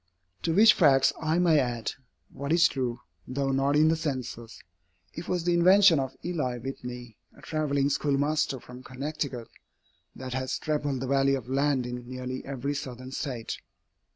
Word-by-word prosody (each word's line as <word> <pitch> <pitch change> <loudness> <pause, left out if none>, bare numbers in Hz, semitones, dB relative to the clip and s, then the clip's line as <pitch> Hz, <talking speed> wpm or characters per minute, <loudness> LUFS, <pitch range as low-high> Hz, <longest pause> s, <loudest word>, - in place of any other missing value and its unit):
To 165 - 0
which 215 +2 +8
facts 135 -6 +4
I 160 +1 +1
may 170 -4 +4
add, 120 -3 -1 0.4
what 140 +2 -5
is 170 0 +6
true, 125 -3 -3 0.3
though 135 +1 -1
not 135 +2 +1
in 155 +1 +5
the 165 - +3
Census, 130 -7 -5 0.5
it 165 - -7
was 180 -2 -1
the 175 0 +2
invention 180 -1 +6
of 135 0 -4
Eli 150 -8 -2
Whitney, 125 -2 -7 0.2
a - - -16
travelling 140 -3 0
schoolmaster 145 0 0
from 125 +1 -12
Connecticut, 130 -2 -5 0.7
that 130 -1 -6
has 130 0 -2
trebled 145 -4 -2
the 130 - -3
value 135 0 +3
of 125 -2 -9
land 135 -1 +1
in 125 0 -6
nearly 130 0 -5
every 140 +1 -3
Southern 130 -2 -6
State. 125 -5 -4
135 Hz, 160 wpm, -27 LUFS, 125-155 Hz, 0.7 s, which